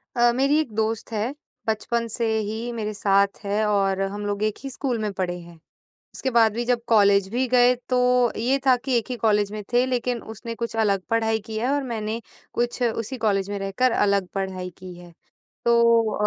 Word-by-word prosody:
अ, 240 0 +4
मेरी 275 +4 +3
एक 300 -8 -2
दोस्त 220 +1 -1
है, 220 +4 -1 0.3
बचपन 230 +2 -1
से 235 - -1 0.2
ही 225 +3 -4
मेरे 215 -2 -3
साथ 200 -1 +2
है 205 +2 0
और 195 -2 +1
हम 205 +1 -3
लोग 205 +1 -2
एक 215 -1 0
ही 275 - -4
स्कूल 260 -2 -2
में 215 -1 -2
पढ़े 180 -2 -2
हैं। 170 0 -13 0.6
उसके 265 - -2
बाद 230 -3 +4
भी 240 +1 -2
जब 245 0 +1
कॉलेज 200 -3 +4
भी 245 +5 0
गए 250 0 +5
तो 255 - +2 0.4
ये 255 +5 +1
था 260 -1 +6
कि 265 -2 +1
एक 230 - -6
ही 250 - -2
कॉलेज 210 -2 +3
में 215 0 -5
थे 245 +1 +4
लेकिन 250 -2 -1
उसने 230 +2 -6
कुछ 230 0 -4
अलग 200 -4 +2
पढ़ाई 225 -1 +2
की 220 - -6
है 245 +4 0
और 285 0 +1
मैंने 225 -3 -3 0.3
कुछ 240 +1 -1
उसी 230 +1 -1
कॉलेज 195 -1 +1
में 205 - -3
रहकर 195 +6 +1
अलग 200 -2 +2
पढ़ाई 190 -2 -3
की 185 -1 -9
है, 175 -1 -13 0.5
तो 235 -2 +4
220 Hz, 205 wpm, -24 LUFS, 200-240 Hz, 0.6 s, था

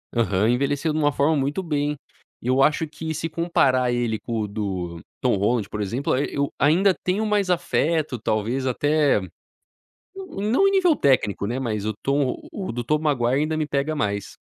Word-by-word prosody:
Aham. 110 -2 +2
Envelheceu 140 +5 +1
de 155 - -1
uma 145 -1 +3
forma 145 +4 +2
muito 145 +6 -1
bem. 150 -3 -1 0.5
E - - -7
eu 130 +1 +3
acho 155 +2 +2
que 160 +1 -5
se 160 +2 -3
comparar 140 -7 +2
ele 120 -2 0
com 115 -2 -3
o 105 - -2
do 95 -5 -4 0.2
Tom - - +2
Holland, 105 +2 0
por 105 - -4
exemplo, 120 +9 -1
eu 140 +1 -1
ainda 180 +7 +4
tenho 195 +4 0
mais 205 -3 +1
afeto 160 -5 0
talvez 115 +4 -1
até, 145 +1 +2 1.0
não 320 - 0
em - - +3
nível 365 -5 +4
técnico, 130 - +1
né, 120 +5 -2
mas 110 -5 -2
o 110 - -1
Tom 140 -1 0
o 195 -2 -4
do 120 +1 -4
Tobey 150 +5 0
Maguire 135 -2 +1
ainda 155 +1 -1
me 155 -1 -1
pega 145 +2 -1
mais. 100 -8 -2
140 Hz, 180 wpm, -23 LUFS, 120-160 Hz, 1.0 s, ainda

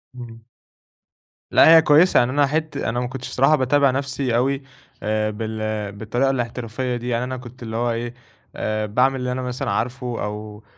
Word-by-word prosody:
إمم. 115 -2 -10 1.1
لأ 165 - +7
هي - - +7
كويسة. 160 +4 +5
يعني 120 +1 +2
أنا 145 +1 +3
حت 155 0 -2
أنا 120 -3 -1
ما 125 - -2
كنتش 130 0 -7
بصراحة 135 +4 +4
باتابع 140 0 +3
نفسي 135 -2 -2
أوي 135 +3 +1 0.4
آآ 110 0 0
بال 110 -1 -4
بالطريقة 110 +6 -1
الاحترافية 125 0 -3
دي. 120 +1 -4
يعني 120 0 0
أنا 130 +1 -4
كنت 125 0 -11
اللي 110 -1 -6
هو 120 +1 0
إيه، 120 +1 -4 0.4
آآ 110 0 -2
باعمل 125 +6 +2
اللي 125 0 -2
أنا 130 +1 -3
مثلًا 125 0 -3
عارفه، 125 0 -2
أو 105 0 -6
125 Hz, 180 wpm, -22 LUFS, 115-135 Hz, 1.1 s, لأ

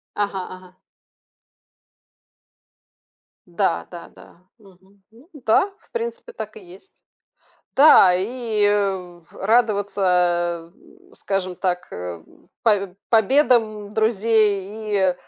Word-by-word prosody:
Ага 205 -1 -2 0.2
ага. 185 0 -16 2.7
Да, 185 +2 -1
да, 175 -1 -10
да, - - -18 0.2
мгм, 195 -1 -23
ну 240 +8 -21
да, 280 - +1
в - - -30
принципе, 470 0 -5
так 465 - -8
и - - -10
есть. 375 +2 -16 0.7
Да 265 -10 +7
и, 220 +3 -2
э, 190 -4 -1
радоваться, 180 -6 0
эм, - - -23
скажем 185 -2 -3
так, 180 -1 -2
эм, 90 -2 -9
павь 200 -5 +1 0.2
победам 220 -3 +2
друзей 215 -1 0 0.2
и, - - -15
205 Hz, 100 wpm, -21 LUFS, 185-225 Hz, 2.7 s, Да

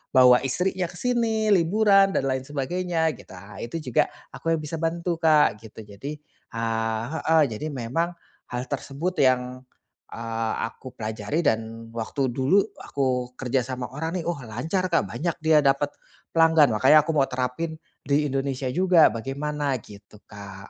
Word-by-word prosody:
bawa 125 -1 +7
istrinya 180 +7 -1
ke 180 - -13
sini, 225 -1 0
liburan 195 +2 +4
dan - - +1
lain 130 0 -3
sebagainya, 160 +3 -1
gitu, 95 - -13
ah 100 +2 -11
itu 120 +6 -6
juga 125 -5 +2 0.2
aku 165 0 -1
yang 155 - -5
bisa 155 +2 -5
bantu 170 +1 -1
Kak, 155 -9 +4
gitu. 110 0 -11
Jadi, 105 +9 -7 0.4
eee 115 -1 -1
heeh, 160 0 +2
jadi 110 +8 -4
memang 150 +6 -2 0.3
hal 125 0 -3
tersebut 145 +6 -3
yang, 130 -1 +1 0.5
eee, 115 -1 -3 0.2
aku 130 - -12
pelajari 110 +6 -3
dan 115 0 -1
waktu 125 +4 -1
dulu 135 +11 +3 0.2
aku 125 -2 -1
kerja 130 0 0
sama 130 -1 -4
orang 160 +5 -3
nih, - - -10
oh 175 - 0
lancar 160 - -2
Kak, 165 - +2
banyak 170 0 -2
dia 160 -1 +5
dapet 140 +1 +2 0.4
pelanggan. 160 -6 +5
Makanya 140 +7 +6
aku 165 - 0
mau 135 -2 +3
terapin 130 +6 -3 0.3
di 145 +2 +1
Indonesia 135 -1 -2
juga, 180 0 +5
bagaimana, 140 +4 -3
gitu 105 0 -15
Kak. 100 -1 -11
140 Hz, 155 wpm, -25 LUFS, 120-165 Hz, 0.5 s, bawa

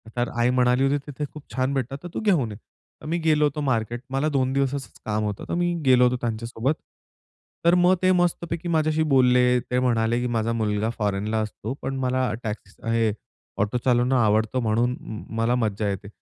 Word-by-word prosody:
तर 120 0 0
आई 120 +1 +3
म्हणाली 125 +1 +3
होती, 140 +1 +2
तिथे 145 +1 -4
खूप 150 -2 -10
छान 130 +2 0
भेटतात, 135 0 -2
तर 175 - -5
तू - - -2
घेऊन 170 - +2
ये. 105 - -8 0.5
मी 170 +2 0
गेलो 155 -2 +3
होतो 150 +1 -1
मार्केट 120 -3 -1
मला 140 +3 +1
दोन 130 -3 +1
दिवसांचं 135 -3 -1 0.2
काम 105 0 -1
होतं, 105 -1 -3
तर - - -2
मी 175 0 +1
गेलो 125 -1 +6
होतो 125 - +2
त्यांच्यासोबत. 115 +4 -1 0.9
तर 170 +1 +6
मग 185 +1 +5
ते 185 0 +4
मस्तपैकी 175 -1 0
माझ्याशी 155 -1 +2
बोलले. 125 -1 +4
ते 125 +1 -1
म्हणाले 120 -1 +1
की 125 - -1
"माझा 115 -1 0
मुलगा 110 -1 0
फॉरेनला 105 +1 -1
असतो. 110 +2 -5
पण 135 - -3
मला 130 -2 0
टॅक्सी, 105 -3 -5
स - - -26
हे 115 -2 +2 0.5
ऑटो 105 +4 0
चालवणं 125 +1 +3
आवडतं, 110 +1 +2
म्हणून 120 +3 +1 0.4
मला 115 +2 +2
म - - 0
मज्जा 105 -1 -1
येते. 100 +1 -4
125 Hz, 190 wpm, -24 LUFS, 110-140 Hz, 0.9 s, गेलो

